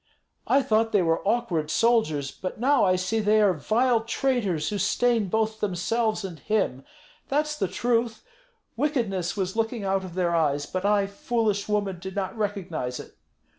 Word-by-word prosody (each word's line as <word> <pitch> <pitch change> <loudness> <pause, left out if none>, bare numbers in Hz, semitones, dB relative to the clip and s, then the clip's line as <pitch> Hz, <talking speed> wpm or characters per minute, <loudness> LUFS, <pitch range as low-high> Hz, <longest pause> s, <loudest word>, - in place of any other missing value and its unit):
I 275 0 +4
thought 225 0 +1
they 200 -3 +4
were 165 -1 +1
awkward 195 -10 0
soldiers, 155 - +2
but 185 +3 -6
now 270 +2 +3
I 185 -1 +4
see 185 +5 -1
that 215 - -3
they 215 +1 +4
are 205 -3 +4
vile 230 - +1
traitors, 230 - 0
who 205 -1 -3
stain 225 +1 +2
both 220 +2 0
themselves 215 +3 -1
and 170 -5 -7
him. 195 -9 -1 0.4
That's 300 +2 0
the 195 - -1
truth! 230 +2 -1 0.5
Wickedness 220 - -1
was 190 0 -2
looking 225 -1 -1
out 195 0 0
of 180 -2 -9
their 175 -2 +1
eyes; 145 -3 +1
but 185 +5 -4
I, 205 -1 +3
foolish 205 0 -1
woman, 200 -3 -1
did 190 +1 -7
not 190 +1 -3
recognize 185 - -3
it. - - -10
205 Hz, 170 wpm, -26 LUFS, 185-230 Hz, 0.5 s, I